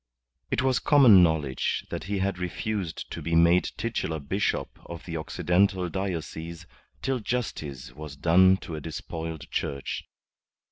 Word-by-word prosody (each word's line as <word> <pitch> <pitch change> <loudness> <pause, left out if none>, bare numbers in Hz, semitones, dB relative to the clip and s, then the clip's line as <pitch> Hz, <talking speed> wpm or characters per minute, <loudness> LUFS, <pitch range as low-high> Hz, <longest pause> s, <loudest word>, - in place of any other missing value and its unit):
It 130 - 0
was 130 -1 +2
common 130 -10 +7
knowledge 75 -6 +1
that - - -4
he 100 +1 -2
had 95 -1 -1
refused 90 -1 -3
to - - -5
be 85 0 -1
made 85 +2 +5
titular 110 -8 -2
bishop 95 +9 -2
of 85 -1 -8
the 85 - -5
Occidental 90 +4 +1
diocese 85 -2 -4 0.4
till 135 -2 0
justice 75 - -4
was 75 0 -8
done 90 +5 +5
to 85 - -7
a 75 - -4
despoiled 80 0 -6
Church. 70 -1 -3
85 Hz, 140 wpm, -27 LUFS, 80-100 Hz, 0.4 s, common